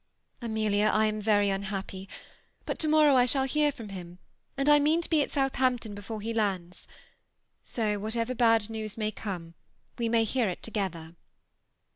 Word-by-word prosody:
Amelia, 215 Hz, -2 st, +1 dB
I 215 Hz, 0 st, +3 dB
am 215 Hz, 0 st, -1 dB
very 205 Hz, -1 st, +3 dB
un 195 Hz, 0 st, -1 dB
happy; 195 Hz, -1 st, -6 dB, 0.6 s
but -, -, -4 dB
to 315 Hz, -, +1 dB
morrow 305 Hz, -2 st, +5 dB
I 250 Hz, -1 st, +5 dB
shall 270 Hz, +1 st, +2 dB
hear 295 Hz, +2 st, +2 dB
from 230 Hz, -7 st, -10 dB
him, 180 Hz, -2 st, -9 dB, 0.4 s
and 275 Hz, +1 st, 0 dB
I 295 Hz, 0 st, +7 dB
mean 305 Hz, +3 st, +3 dB
to -, -, -5 dB
be 310 Hz, -2 st, +4 dB
at -, -, -1 dB
Southampton 255 Hz, -5 st, 0 dB
before 205 Hz, +2 st, -7 dB
he 225 Hz, +2 st, -3 dB
lands. 190 Hz, -5 st, -2 dB, 0.8 s
So 210 Hz, -3 st, -2 dB
what 215 Hz, +3 st, -2 dB
ever 230 Hz, +2 st, -1 dB
bad 225 Hz, -3 st, +3 dB
new& 220 Hz, -1 st, -5 dB
may 215 Hz, -1 st, -1 dB
come, 175 Hz, -6 st, -6 dB, 0.5 s
we 230 Hz, -1 st, 0 dB
may 230 Hz, 0 st, +3 dB
hear 225 Hz, -1 st, 0 dB
it 180 Hz, -, -6 dB
together." 175 Hz, -7 st, -4 dB
220 Hz, 180 wpm, -28 LUFS, 200-255 Hz, 0.8 s, I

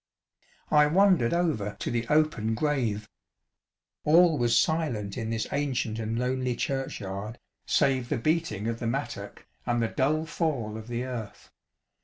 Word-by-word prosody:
I 150 Hz, 0 st, +6 dB
wandered 180 Hz, -7 st, +4 dB
over 155 Hz, -, 0 dB
to -, -, -3 dB
the 120 Hz, -1 st, -1 dB
open 150 Hz, -8 st, +2 dB
grave. 120 Hz, -7 st, -1 dB, 1.0 s
All 165 Hz, +2 st, +5 dB
was 120 Hz, -1 st, +3 dB
silent 125 Hz, -12 st, 0 dB
in 115 Hz, -3 st, -3 dB
this 115 Hz, -1 st, -1 dB
ancient 130 Hz, -6 st, -1 dB
and 115 Hz, 0 st, -2 dB
lonely 125 Hz, 0 st, -1 dB
churchyard, 110 Hz, -5 st, -4 dB, 0.3 s
save 130 Hz, -3 st, +2 dB
the -, -, 0 dB
beating 115 Hz, -, 0 dB
of 115 Hz, 0 st, -2 dB
the 120 Hz, -, -2 dB
mattock 115 Hz, -, -4 dB, 0.2 s
and 120 Hz, 0 st, 0 dB
the 115 Hz, -, +1 dB
dull 155 Hz, +4 st, +1 dB
fall 140 Hz, -10 st, -2 dB
of 110 Hz, 0 st, -8 dB
the 120 Hz, 0 st, -3 dB
earth. 120 Hz, -5 st, -7 dB
120 Hz, 145 wpm, -28 LUFS, 110-150 Hz, 1.0 s, I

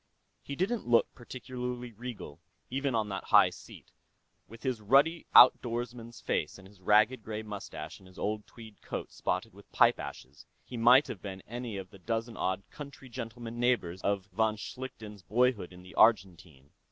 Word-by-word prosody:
He 140 Hz, -, -6 dB
didn't 200 Hz, -, -1 dB
look 120 Hz, -1 st, +3 dB
particularly 125 Hz, 0 st, -6 dB
regal, 115 Hz, -9 st, -8 dB, 0.3 s
even 135 Hz, -1 st, -1 dB
on 110 Hz, -2 st, 0 dB
that 95 Hz, -1 st, -5 dB
high -, -, +6 dB
seat -, -, -13 dB, 0.6 s
with 115 Hz, +2 st, -13 dB
his 130 Hz, -5 st, -1 dB
ruddy 140 Hz, +10 st, +3 dB
outdoorsman's 120 Hz, -1 st, +5 dB
face -, -, -1 dB
and 95 Hz, -1 st, -14 dB
his 100 Hz, -1 st, -20 dB
ragged 105 Hz, +6 st, +4 dB
gray 110 Hz, 0 st, -5 dB
mustache 100 Hz, -7 st, -7 dB
and 95 Hz, -, -17 dB
his 95 Hz, -, -18 dB
old 105 Hz, 0 st, -3 dB
tweed 110 Hz, -3 st, -13 dB
coat -, -, -5 dB
spotted -, -, -2 dB
with -, -, -17 dB
pipe -, -, +4 dB
ashes, 70 Hz, +3 st, -9 dB, 0.2 s
he 125 Hz, -, -9 dB
might 125 Hz, +4 st, +6 dB
have 95 Hz, -, -7 dB
been 95 Hz, -2 st, -7 dB
any 120 Hz, -2 st, -5 dB
of 95 Hz, -1 st, -8 dB
the 100 Hz, -, -14 dB
dozen 115 Hz, +3 st, -3 dB
odd 95 Hz, 0 st, -1 dB
country 140 Hz, -2 st, -10 dB
gentleman 120 Hz, -1 st, -7 dB
neighbors 105 Hz, -8 st, +1 dB
of 100 Hz, -1 st, 0 dB
von 110 Hz, +1 st, +2 dB
Schlichten's 110 Hz, -3 st, -8 dB
boyhood 115 Hz, -1 st, +1 dB
in 90 Hz, 0 st, -13 dB
the 90 Hz, -, -13 dB
Argentine. 90 Hz, -, +2 dB
115 Hz, 170 wpm, -30 LUFS, 100-125 Hz, 0.6 s, high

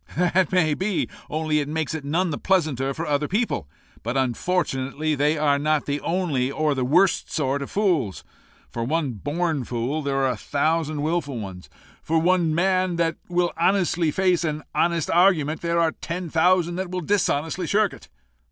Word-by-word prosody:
"That 180 Hz, 0 st, +2 dB
may 170 Hz, -5 st, +3 dB
be; 190 Hz, +4 st, -1 dB, 0.2 s
only 155 Hz, 0 st, 0 dB
it 145 Hz, -, -2 dB
makes 160 Hz, 0 st, -2 dB
it 160 Hz, -3 st, -4 dB
none 165 Hz, +5 st, 0 dB
the 145 Hz, -, -3 dB
pleasanter 150 Hz, -8 st, +1 dB
for 160 Hz, +5 st, -4 dB
other 150 Hz, -1 st, 0 dB
people; 210 Hz, -, -1 dB, 0.3 s
but, 120 Hz, +4 st, -2 dB
unfortunately, 135 Hz, +2 st, -1 dB
they 150 Hz, +2 st, +1 dB
are 145 Hz, -2 st, +2 dB
not 155 Hz, 0 st, +1 dB
the 145 Hz, 0 st, -2 dB
only 165 Hz, -8 st, 0 dB
or 150 Hz, +1 st, 0 dB
the 130 Hz, -2 st, -1 dB
worst 170 Hz, +8 st, +2 dB
sort 140 Hz, -2 st, 0 dB
of 140 Hz, -, -5 dB
fools. 175 Hz, -, 0 dB, 0.5 s
For 115 Hz, -, -3 dB
one 150 Hz, +2 st, 0 dB
born 145 Hz, -, -2 dB
fool 125 Hz, +6 st, -2 dB
there 140 Hz, -2 st, -2 dB
are 135 Hz, -1 st, +2 dB
a 120 Hz, -, -4 dB
thousand 155 Hz, +4 st, -1 dB
wilful 150 Hz, -5 st, -1 dB
ones. 95 Hz, -3 st, -8 dB, 0.3 s
For 165 Hz, -, 0 dB
one 170 Hz, -1 st, +2 dB
man 185 Hz, 0 st, +1 dB
that 165 Hz, -1 st, 0 dB
will 175 Hz, 0 st, +1 dB
honestly 175 Hz, -2 st, +2 dB
face 180 Hz, 0 st, +1 dB
an 155 Hz, -1 st, -2 dB
honest 170 Hz, -2 st, +1 dB
argument, 165 Hz, -4 st, +3 dB
there 170 Hz, 0 st, 0 dB
are 165 Hz, -1 st, +3 dB
ten 170 Hz, +1 st, -6 dB
thousand 175 Hz, +1 st, +3 dB
that 190 Hz, -1 st, -3 dB
will 185 Hz, 0 st, -3 dB
dishonestly 170 Hz, -2 st, 0 dB
shirk 205 Hz, +1 st, +2 dB
it. -, -, -14 dB
160 Hz, 180 wpm, -24 LUFS, 145-175 Hz, 0.5 s, may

